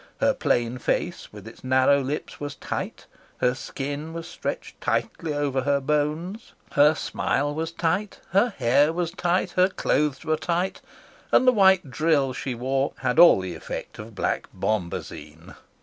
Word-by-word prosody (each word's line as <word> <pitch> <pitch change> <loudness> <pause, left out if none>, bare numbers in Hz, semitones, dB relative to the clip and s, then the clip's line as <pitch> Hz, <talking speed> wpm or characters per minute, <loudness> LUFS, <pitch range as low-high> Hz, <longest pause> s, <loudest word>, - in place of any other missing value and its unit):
Her - - +3
plain 120 +1 0
face - - -2
with - - -11
its - - -13
narrow 130 +2 +4
lips 140 +3 -4
was 145 0 -5
tight, - - -5 0.3
her 125 0 +2
skin 145 +4 -5
was 165 0 -6
stretched 485 - -6
tightly 165 -3 -1
over 145 -2 0
her 140 +1 +1
bones, 150 - -2 0.2
her 150 +2 +5
smile 145 -1 -1
was 160 +2 -3
tight, 175 +5 -1
her 200 +7 +4
hair 140 +5 +4
was 170 0 -2
tight, 180 0 0
her 185 +1 +3
clothes 150 -6 0
were 155 0 +1
tight, 175 +4 -2 0.5
and 255 - +5
the - - +9
white 190 - +4
drill 145 -3 +2
she 130 0 -4
wore 135 +3 -1
had - - +1
all 170 - +8
the 95 -1 -5
effect 80 - -7
of 110 0 -9
black - - -1
bombazine. 85 -5 -4
145 Hz, 160 wpm, -25 LUFS, 130-170 Hz, 0.5 s, the